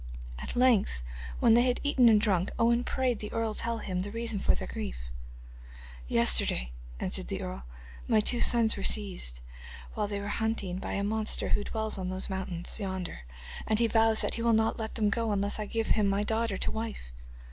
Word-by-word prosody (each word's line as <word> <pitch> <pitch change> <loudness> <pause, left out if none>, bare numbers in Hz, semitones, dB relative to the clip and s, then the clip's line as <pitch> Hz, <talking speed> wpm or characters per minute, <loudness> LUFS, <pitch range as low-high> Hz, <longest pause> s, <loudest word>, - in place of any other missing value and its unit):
At - - -6
length, 240 - +3 0.4
when 230 - +5
they 235 - +6
had 250 0 +1
eaten 265 -5 +5
and 215 -2 +5
drunk, 195 -4 +1
Owen 235 +1 +3
prayed 250 -4 -1
the 210 - -6
earl 225 -1 -1
to - - -2
tell 230 0 -1
him 185 -4 -3
the 200 - -4
reason 230 -2 -2
of - - +4
their - - -5
grief. - - -5 1.1
'Yesterday,' - - +3 0.3
answered - - -2
the - - -3
earl, 60 +1 -6 0.4
'my 220 - +4
two 240 +3 +1
sons 230 -2 +4
were 195 - -6
seized, 180 - 0 0.5
while 210 - -1
thy 205 0 -3
were 200 - -5
hunting, 205 -4 -2
by - - -4
a 200 - -1
monster 215 +1 0
who 205 - +1
dwells 220 -1 -2
on 185 -1 -3
those 185 +1 -4
mountains 185 0 -2
yonder, 190 - -5 0.4
and 220 - +2
he 235 - +3
vows 225 -1 +4
that - - +1
he 230 - -3
will 230 0 +3
not 220 +1 +1
let 220 0 -5
them 210 -3 +1
go 230 0 0
unless 200 +1 -1
I 210 - -3
give 225 0 -2
him 210 -2 +2
my 200 +1 +1
daughter 220 -1 0
to - - -2
wife. 220 - -5
215 Hz, 205 wpm, -29 LUFS, 190-230 Hz, 1.1 s, they